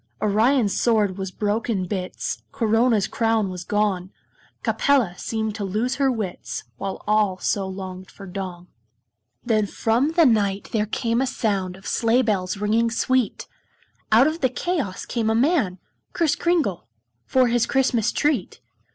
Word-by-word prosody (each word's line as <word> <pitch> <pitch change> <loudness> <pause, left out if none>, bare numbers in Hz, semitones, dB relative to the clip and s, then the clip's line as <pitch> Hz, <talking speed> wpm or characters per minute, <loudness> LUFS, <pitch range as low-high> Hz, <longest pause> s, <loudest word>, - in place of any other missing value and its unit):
Orion's 215 +1 +2
sword 210 -5 +2
was 190 -1 -3
broke 210 +4 -2
in 195 -5 0
bits, 185 0 -4
Corona's 225 -4 +2
crown 225 -4 0
was 180 -1 -6
gone, 200 -2 0 0.5
Capella 265 - +2
seemed 220 +2 -3
to 205 - -5
lose 220 +7 -1
her 275 -2 +3
wits, 215 -7 -4
While 195 -1 -5
all 210 -3 +2
so 195 +1 -1
longed 190 0 -7
for 200 - -12
dawn. 180 -2 -6 0.8
Then 215 -3 +2
from 240 +10 +1
the 335 -1 +5
night 205 -5 +1
there 215 -1 0
came 230 +2 0
a 265 - +1
sound 195 -7 -1
Of 195 - -17
sleigh 235 +2 +2
bells 195 -4 -1
ringing 220 +3 +1
sweet; 250 0 0 0.6
Out 225 +5 +7
of 315 +3 -1
the 260 - +3
chaos 265 - -2
came 225 -2 -1
a 220 - +2
man 250 - +2 0.4
Kris 325 -4 +2
Kringle 320 - 0 0.4
for 255 -2 +3
his 240 -1 +2
Christmas 255 -4 +2
treat. 290 -10 0
220 Hz, 150 wpm, -23 LUFS, 195-250 Hz, 0.8 s, Out